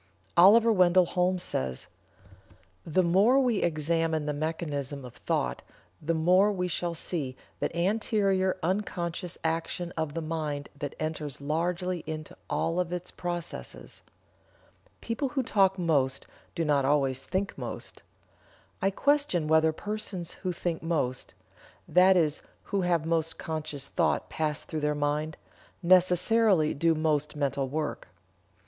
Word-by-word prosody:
Oliver 220 +6 +7
Wendell 180 -2 +5
Holmes 180 +1 0
says: 65 -1 -2 1.0
"The 175 +3 +1
more 200 +10 +4
we 245 -6 +2
examine 160 -1 0
the 150 - -1
mechanism 145 -3 -3
of 125 - -10
thought 60 0 -2 0.4
the 165 +2 0
more 180 +6 +4
we 180 -2 -1
shall 175 -1 -2
see 145 -6 -3 0.2
that - - -2
anterior 195 0 +1
unconscious 175 -1 -2
action 165 +2 -2
of 160 -2 -3
the 165 - -2
mind 155 -3 -3
that 145 0 -5
enters 155 -3 -4
largely 175 +5 -1
into 155 -1 -6
all 165 +2 0
of 175 -1 -1
its 180 0 -5
processes. 175 -2 -6 1.0
People 235 +4 -2
who 265 0 -1
talk 195 -5 +3
most 145 -7 +1 0.3
do 165 - 0
not 145 -2 +2
always 135 -2 +1
think 195 +1 -2
most. - - -7 0.8
I 195 - +3
question 280 - +1
whether 160 0 +4
persons 190 -1 -4
who 185 - -4
think 170 -1 -3
most 150 -7 -2 0.5
that 185 +1 +5
is 155 -3 +1 0.2
who 200 - -1
have 170 -3 +1
most 165 -1 0
conscious 150 -3 -4
thought 170 -2 0
pass 155 -1 -1
through 160 - -4
their 150 0 +1
mind 150 +2 -1 0.5
necessarily 180 0 +4
do 165 +3 +2
most 155 -1 0
mental 140 -2 -1
work. 150 +1 -3
165 Hz, 135 wpm, -28 LUFS, 150-185 Hz, 1.0 s, Oliver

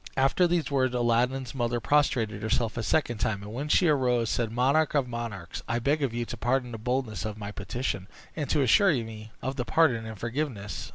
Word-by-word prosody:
After 135 +7 +4
these 170 -3 0
words, 130 -2 +1
Aladdin's 120 +2 +1
mother 120 -2 -1
prostrated 115 -7 +1
herself 110 +1 0
a 115 - -2
second 120 -1 0
time, 100 -2 -1
and, 105 +1 -8
when 140 +5 -4
she 175 - +4
arose, 125 -6 +2
said, 115 -2 -1
"Monarch 140 +6 +2
of 140 -3 +2
monarchs 115 -7 -5
I 120 - 0
beg 140 +6 +1
of 135 -4 +1
you 120 0 -2
to - - -6
pardon 125 0 0
the 115 - -6
boldness 125 -1 -2
of 110 -1 -4
my 105 -1 -6
petition, 100 -2 -3 0.3
and 150 -3 -3
to 145 - +3
assure 190 - +5
me 110 -4 -5
of 135 +1 -3
your 125 - 0
pardon 125 -8 +2
and 110 -1 -7
forgiveness." 115 -3 -4
120 Hz, 210 wpm, -28 LUFS, 110-135 Hz, 0.3 s, assure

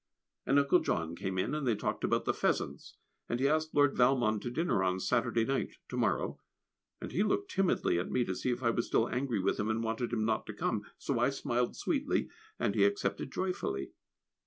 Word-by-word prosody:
And 135 - +4
Uncle 140 +5 +5
John 85 0 -1
came 95 +1 -3
in, 95 - 0
and 150 -3 -1
they 115 - +3
talked 105 - -3
about - - +1
the - - +2
pheasants, - - -1 0.3
and 120 - -1
he 135 - +3
asked 155 +1 0
Lord 145 -1 +4
Valmond 120 -4 +3
to - - -3
dinner 125 - +1
on 95 0 +1
Saturday 115 +3 +1
night 135 +1 -1
(to - - -5
morrow), - - 0 0.6
and - - -6
he 185 - 0
looked 385 - 0
timidly 185 - +2
at 90 - -3
me, 125 -1 +1
to 95 - -2
see 125 - -2
if 125 +1 -2
I 115 - +3
was 120 0 -1
still 115 - +2
angry 125 -2 -1
with 95 +1 0
him 105 +2 0
and 110 +1 0
wanted 115 +2 -2
him 110 -2 0
not 110 -1 0
to - - -5
come, - - -1 0.2
so - - -1
I - - +4
smiled 120 0 -1
sweetly, 290 -2 0 0.3
and - - 0
he - - +3
accepted 400 0 0
joyfully. 180 - -2
120 Hz, 215 wpm, -32 LUFS, 110-145 Hz, 0.6 s, Uncle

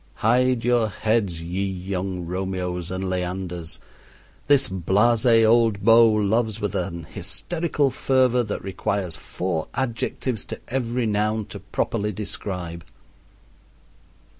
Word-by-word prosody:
Hide 125 +1 +2
your 120 -3 +3
heads, 100 -4 0
ye 90 +4 -2
young 95 -1 -3
Romeos 90 -1 -3
and 95 +1 -3
Leanders! 90 -2 -3 0.7
this 140 -1 +5
blase 105 +6 +2 0.2
old 115 -2 +4
beau 115 0 +8
loves 110 +1 +1
with 105 -3 -2
an 85 -3 -3
hysterical 160 - -1
fervor 130 -1 +2
that 105 -3 -4
requires 95 -2 -2
four 90 -3 -3
adjectives 120 -2 -2
to - - -7
every 125 -1 -1
noun 105 0 0
to - - -6
properly 105 +1 -2
describe. 90 -4 -5
105 Hz, 115 wpm, -24 LUFS, 90-115 Hz, 0.7 s, beau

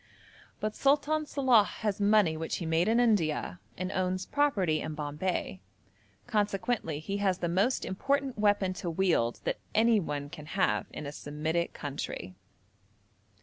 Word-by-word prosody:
But 215 0 -2
Sultan 295 +2 +2
Salàh 255 -7 +4
has 210 0 -3
money 205 -5 +4
which 160 +1 -3
he 170 - -4
made 160 +2 +2
in 230 +2 +3
India, 170 - +1 0.2
and 185 +1 -3
owns 185 0 -1
property 200 - +1
in 155 -1 -4
Bombay; 150 - -3 0.6
consequently 205 -6 -1
he 195 +7 -3
has 195 -3 +1
the 175 - -2
most 195 +9 +1
important 275 +6 -1
weapon 205 -3 +2
to 175 - -2
wield 165 -9 +1
that - - -2 0.2
anyone 200 -11 +2
can 150 -3 -9
have 105 - +2
in 150 - -7
a 140 - -4
Semitic 155 +3 -2
country. 135 -10 -5
185 Hz, 145 wpm, -30 LUFS, 155-215 Hz, 0.6 s, Salàh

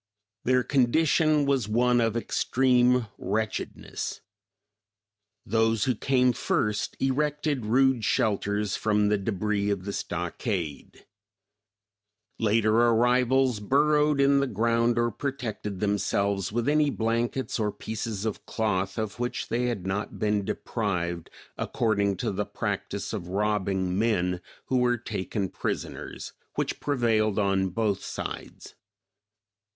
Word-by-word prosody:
Their 125 0 +3
condition 150 +3 +3
was 135 -6 +1
one 120 +2 +3
of 115 0 +1
extreme 125 0 +2
wretchedness. 110 0 -3 1.2
Those 115 0 +2
who 130 - +2
came 125 +1 +2
first 105 -2 -1
erected 145 -2 0
rude 130 0 +3
shelters 105 -1 0
from 105 -1 +2
the 105 -1 +2
debris 100 0 -1
of 95 -2 -2
the 100 - -3
stockade; 90 - -4 1.3
later 110 0 +2
arrivals 125 +1 +3
burrowed 150 +5 +3
in 140 0 +5
the 140 - +1
ground 115 +1 +1
or 120 0 +2
protected 110 -7 -4
themselves 100 -1 0
with 120 +2 -1
any 150 0 +3
blankets 115 +2 -1
or 105 -1 +1
pieces 110 -1 -4
of 110 - -4
cloth 100 -3 -1
of 110 0 -3
which 120 0 -3
they 120 +1 0
had 115 -7 -2
not 100 +2 -3
been 105 -1 +1
deprived 90 -6 -2 0.3
according 100 -4 0
to - - -1
the 100 +1 -2
practice 100 +1 -3
of 95 -5 -4
robbing 95 -2 0
men 90 -5 +1 0.2
who 130 - +1
were 120 0 +2
taken 100 -3 -3
prisoners - - -5 0.2
which - - -2
prevailed 115 -7 +1
on 95 -2 +2
both 105 +1 -1
sides. - - -7
110 Hz, 120 wpm, -27 LUFS, 100-125 Hz, 1.3 s, in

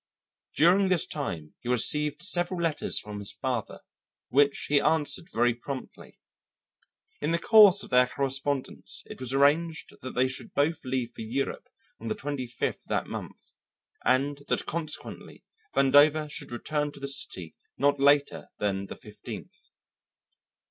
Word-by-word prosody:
During 185 +4 +4
this 180 -4 +2
time 85 - -5
he 120 - -7
received 150 +5 +2
several 175 -1 +1
letters 165 -3 0
from 105 -1 -5
his 100 - -5
father 125 -5 -3 0.5
which 140 +1 +2
he 145 -1 +3
answered 160 +2 +1
very 120 +1 +2
promptly. 130 +3 -8 1.0
In 150 - 0
the 170 - +2
course 205 +1 +7
of - - -11
their 125 0 +5
correspondence 135 0 -3
it - - -10
was 130 -1 -1
arranged 155 +4 +2
that 130 - -7
they 130 +1 +3
should 130 0 -8
both 160 +3 +1
leave 125 -2 -2
for - - -10
Europe 125 +5 -3 0.3
on - - -7
the 215 - -1
twenty 145 -10 -4
fifth 120 - -3
of - - -27
that - - 0
month, - - -8 0.5
and 140 +2 +1
that - - 0
consequently, 155 -2 -5 0.3
Vandover 145 +3 +5
should 145 -3 -7
return 145 +4 -2
to - - -12
the 140 - -4
city 90 -11 -3 0.2
not 145 +1 +2
later 140 +1 +3
than 100 -1 -2
the - - -8
fifteenth. 105 -1 -11
140 Hz, 150 wpm, -28 LUFS, 125-155 Hz, 1.0 s, course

